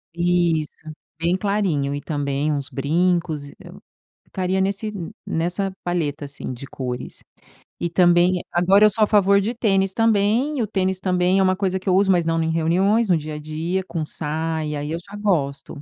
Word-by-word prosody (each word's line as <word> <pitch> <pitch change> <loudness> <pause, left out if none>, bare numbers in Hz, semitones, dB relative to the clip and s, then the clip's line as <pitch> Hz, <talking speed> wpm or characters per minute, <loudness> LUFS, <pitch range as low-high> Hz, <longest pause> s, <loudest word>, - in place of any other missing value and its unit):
Isso. 170 -3 0 0.3
Bem 170 +2 +2
clarinho 190 -9 0
e 145 - -3
também 145 -1 -1
uns 140 -2 -3
brincos 165 +2 0 0.8
ficaria 185 0 -2
nesse 200 +3 -1
n 195 -6 -6 0.2
nessa 180 +4 -1
palheta 160 -4 -2
assim 140 -2 -7
de 125 +2 -8
cores. 125 -2 -6 0.6
E 170 - -1
também 175 +1 +4
agora 190 +4 +4
eu - - +7
sou 215 +1 +2
a - - +4
favor 200 -1 +4
de 215 +5 -1
tênis 195 -5 +1
também, 225 +6 +2
e - - +1
o - - -2
tênis 190 -2 -1
também 180 0 +2
é 190 - +4
uma 185 0 +3
coisa 190 -1 -1
que 190 - -17
eu 185 - +4
uso, 195 0 +4
mas 175 -2 +2
não 165 0 +1
em 160 - 0
reuniões, 190 +8 +2
no 175 - +5
dia 155 0 -6
a - - -6
dia, 160 +5 -2
com 165 -2 -3
saia 160 +1 -3
e 150 - -3
aí 145 +1 -4
eu 165 - -2
já 200 +4 -12
gosto, 150 -7 -1
175 Hz, 190 wpm, -22 LUFS, 155-195 Hz, 0.8 s, eu